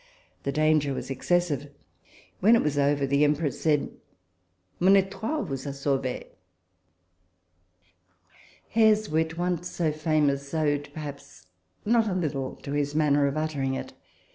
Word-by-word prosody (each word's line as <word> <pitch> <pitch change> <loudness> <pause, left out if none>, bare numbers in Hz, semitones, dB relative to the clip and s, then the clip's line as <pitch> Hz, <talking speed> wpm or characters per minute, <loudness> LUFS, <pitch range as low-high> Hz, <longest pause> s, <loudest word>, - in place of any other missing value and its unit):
The 140 - -2
danger 150 -1 +2
was - - -5
excessive. 145 0 0 0.7
When 220 +5 +6
it - - +2
was 150 -1 0
over, 140 0 +2
the 140 +2 +2
Em 150 0 +4
press 150 -1 -3
said, 150 -3 +1 0.5
" 90 +1 -44
Mon 190 +2 +6
e"toile 195 +10 -1
vous 135 -6 -5
a 140 - -3
sauvee." 135 -2 -2 2.5
Hare's 215 -1 +3
wit, 160 +1 0
once 175 0 -1
so 165 -3 -1
famous, 150 -3 0
owed 145 -2 0
perhaps 140 - -9 0.4
not 225 +1 +3
a 190 - -1
little 140 -7 -2
to 140 - -6
his 145 0 -1
manner 145 -2 +3
of 140 +2 -2
uttering 145 -4 -1
it. - - -6
150 Hz, 140 wpm, -26 LUFS, 140-170 Hz, 2.5 s, When